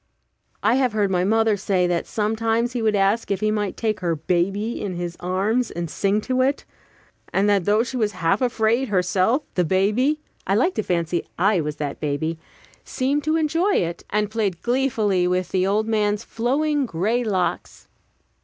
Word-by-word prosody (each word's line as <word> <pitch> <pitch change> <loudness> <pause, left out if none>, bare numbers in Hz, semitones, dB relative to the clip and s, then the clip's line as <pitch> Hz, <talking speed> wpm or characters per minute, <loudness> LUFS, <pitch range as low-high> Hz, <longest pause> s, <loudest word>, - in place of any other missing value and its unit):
I 220 +3 +4
have 255 -4 +1
heard 205 -3 +1
my 180 -1 +1
mother 220 +2 +3
say 190 -2 0
that 175 -1 -1
sometimes 225 +2 0
he 245 - -2
would 215 -1 +2
ask 200 +3 +1
if 200 -2 0
he 215 0 +1
might 210 -2 -2
take 220 -2 -1
her 170 -2 0
baby 185 +8 -1
in 195 -3 -3
his 175 -1 -4
arms 200 +7 0
and 170 -2 -5
sing 200 +1 +1
to 255 +3 0
it; 275 +2 0 0.7
and 195 +2 +2
that 200 -4 +2
though 210 +2 +3
she 255 +1 -5
was 215 -3 0
half 185 +7 0
afraid 235 +1 +1
herself, 195 +7 +1
the 180 - +2
baby 210 - +1 0.3
I 195 - +2
like 305 - +2
to - - -1
fancy 175 -3 -1
I 190 0 +3
was 150 -1 -3
that 145 -2 -4
baby 155 +2 -2 0.4
seemed 280 +3 -1
to 310 +1 +2
enjoy 325 +5 +1
it, 170 -1 -1
and 210 0 0
played 200 -6 -2
gleefully 225 -8 +1
with 180 0 0
the 185 0 +1
old 215 +2 +1
man's 210 -1 0
flowing 280 +4 0
gray 220 +7 0
locks. 190 -5 -2
210 Hz, 180 wpm, -22 LUFS, 185-235 Hz, 0.7 s, I